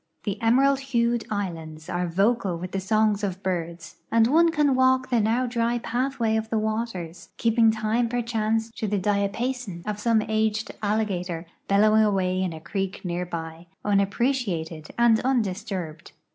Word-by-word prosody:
The 205 +2 -3
emerald 265 +4 +4
hued 240 -3 0
islands 165 -6 -5
are 180 0 -1
vocal 195 +1 +1
with 180 +2 -6
the 195 - -2
songs 215 +1 +1
of 190 -1 -3
birds, 170 -2 -4
and 230 0 +5
one 325 +7 +4
can 300 -4 +2
walk 260 0 +3
the 240 - +3
now 230 +4 +1
dry 235 0 0
pathway 240 -1 -1
of 220 0 -3
the 225 - 0
waters, 215 -6 -3
keei)ing 230 -1 +4
time 220 +2 0
i)erchance 225 -2 -1
to 220 - -2
the 205 0 0
diapason 200 0 -1
of 210 -1 -3
some 220 0 +2
aged 220 0 0
alligator 190 -5 -1 0.2
l)ellowing 215 +2 +5
away 190 -3 +1
in 185 -2 -1
a 160 - -7
creek 195 +3 -4
near 175 0 -2
by, 165 0 -6 0.2
un 205 -1 +3
appreciated 195 - -1
and 235 -2 +5
undisturbed. 200 -9 -2
215 Hz, 160 wpm, -25 LUFS, 185-235 Hz, 0.2 s, and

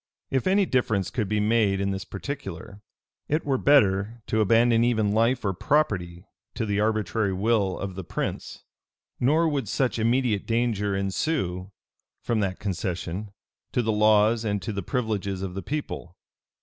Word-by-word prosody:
If 130 +3 0
any 195 +1 +4
difference 110 - 0
could 110 -6 -2
be 105 0 +1
made 105 -2 +2
in 100 0 0
this 95 0 -4
particular, 100 - -7 0.5
it 155 +2 0
were 135 -3 +1
better 110 -4 +3
to 110 - +1
abandon 115 +2 +4
even 110 -4 +2
life 115 +3 +2
or 95 - +1
property 90 - 0 0.3
to 115 - -1
the 100 -1 0
arbitrary 110 -1 0
will 100 -1 +1
of 100 -1 -5
the 95 +1 -6
prince; - - -5 0.6
nor 155 +6 +3
would 140 -7 -1
such 130 -1 0
immediate 115 -2 +1
danger 115 -4 0
ensue, 95 - -2 0.5
from 115 -2 -1
that 95 -3 -1
concession, 95 0 -3 0.4
to 125 - +1
the 110 - +1
laws 110 +1 +4
and 105 -2 -1
to 110 - -3
the 100 - -3
privileges 100 -4 -2
of 95 -2 -4
the 95 - -4
people. 115 - -5
105 Hz, 160 wpm, -26 LUFS, 95-120 Hz, 0.6 s, any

